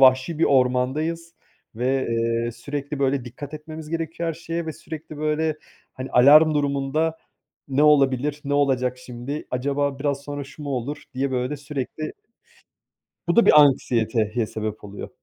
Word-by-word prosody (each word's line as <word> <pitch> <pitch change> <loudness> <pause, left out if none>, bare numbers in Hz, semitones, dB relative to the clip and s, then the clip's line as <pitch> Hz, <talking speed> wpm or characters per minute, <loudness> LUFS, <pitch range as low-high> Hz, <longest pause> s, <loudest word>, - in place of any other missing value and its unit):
vahşi 130 +4 +5
bir 165 - +4
ormandayız 140 +6 +1 0.4
ve, 130 +3 0
eee, 115 0 0
sürekli 140 +4 -5
böyle 135 -2 +1
dikkat 135 +4 -8
etmemiz 155 0 -8
gerekiyor 165 +1 -3
her 165 - -2
şeye 165 +1 -4
ve 160 - -3
sürekli, 155 0 -9
böyle, 155 +1 0 0.4
hani, 130 +1 -7
alarm 150 +5 +7
durumunda 145 +3 0 0.5
"Ne 135 +1 +2
olabilir? 145 -1 +3
Ne 145 0 -1
olacak 130 -3 +1
şimdi? 125 +4 -6
Acaba 140 +2 -1
biraz 140 -1 -1
sonra 145 0 -5
şu 140 +3 -12
mu 145 - -4
olur?" 140 +3 -3
diye 135 +1 -1
böyle 130 +3 -1
sürekli 145 +1 -5 1.2
Bu 170 - +2
da 235 - +6
bir 150 - +8
anksiyeteye 115 -5 +2
sebep 110 -1 -5
oluyor. 100 0 -7
140 Hz, 150 wpm, -23 LUFS, 125-150 Hz, 1.2 s, bir